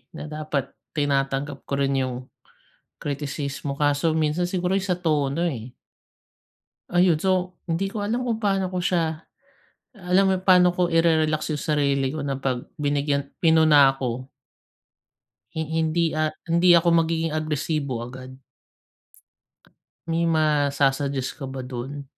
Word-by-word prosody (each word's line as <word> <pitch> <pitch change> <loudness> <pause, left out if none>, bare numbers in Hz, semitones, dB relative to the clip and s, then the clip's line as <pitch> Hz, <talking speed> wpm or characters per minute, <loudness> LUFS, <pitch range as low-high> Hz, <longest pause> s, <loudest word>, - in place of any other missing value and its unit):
na - - -6
dapat 150 -3 -3 0.2
tinatanggap 140 -1 -1
ko - - -5
rin 135 -1 +1
yung 130 -1 -2 0.9
kritisismo, 140 -1 -4
kaso 145 +2 +1
minsan 160 +3 0
siguro 180 0 -1
yung 190 - -1
sa 180 - +1
tono, 155 -2 0
eh. 125 -6 -4 1.2
Ayun. 175 -2 +4
So, 185 +1 0
hindi 180 +3 -1
ko 205 0 -4
alam 235 +4 -1
kung 225 - +1
pa'no 195 -3 +1
ko 180 -1 -3
siya 160 -3 0 0.7
alam 190 -1 +2
mo 190 - +3
yung 185 - -2
paano 180 -2 +5
ko 180 -1 +1
ire-relax 160 -2 +2
yung 145 - -3
sarili 140 -3 +1
ko 150 0 -4
na 140 - -1
'pag 130 -2 -2 0.2
binigyan 140 -1 0
pinuna 155 -4 +5
ako. 130 0 -4 1.3
Hin 160 -1 -2
hindi, 160 +1 +1
ah, 155 0 0 0.2
hindi 175 +1 +5
ako 170 0 +4 0.2
magiging 165 -1 -1
agresibo 150 -4 -2
agad. 130 +1 -9 1.7
May 165 0 0
masa-suggest 140 -3 +1
ka 135 - -4
ba 130 -1 -6
dun? 135 +3 -6
155 Hz, 135 wpm, -24 LUFS, 140-170 Hz, 1.7 s, paano